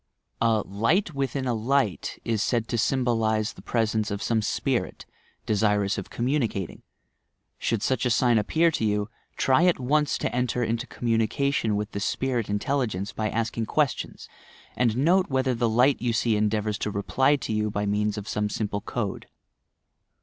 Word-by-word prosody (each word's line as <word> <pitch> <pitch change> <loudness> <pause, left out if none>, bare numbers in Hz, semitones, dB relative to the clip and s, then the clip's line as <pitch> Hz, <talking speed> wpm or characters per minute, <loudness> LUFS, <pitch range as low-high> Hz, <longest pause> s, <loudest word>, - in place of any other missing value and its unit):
A 115 -2 +3
"light 115 - +1
within 135 -1 -2
a 125 - +1
light" 115 -2 0
is 110 -3 0
said 115 0 0
to 120 - -1
symbolize 115 -4 +1
the - - -13
presence 110 -2 0
of 100 0 -3
some 115 -2 +1
"spirit," 105 - -2 0.4
desirous 105 -1 +1
of - - -8
communicat 120 - -1
ing. - - -16 0.8
Should 115 -3 -1
such 130 -2 0
a - - +1
sign 120 -1 +3
appear 165 +10 +2
to 150 - -2
you, 105 0 0 0.3
try 135 +6 +3
at 180 -5 +3
once 150 +4 +1
to - - -2
enter 125 0 0
into 115 +2 -2
commimication 115 0 0
with 105 +2 -3
the 100 - -4
spirit 120 +1 -1
intelligence 105 -3 -1
by 110 -1 -1
asking 115 0 -2
questions - - -1 0.5
and 120 -2 +1
note 180 +7 +3
whether 130 -1 +1
the 120 -1 +1
light 125 +5 +3
you 120 -1 0
see 115 -1 +2
en 105 0 +2
deavours 105 0 -1
to - - -1
reply 130 +8 +2
to 135 - -4
you 105 0 0
by 105 0 -2
means 105 +1 0
of 105 0 -6
some 105 0 -1
simple 105 -1 -2
code. 105 -2 -4
115 Hz, 170 wpm, -26 LUFS, 105-130 Hz, 0.8 s, A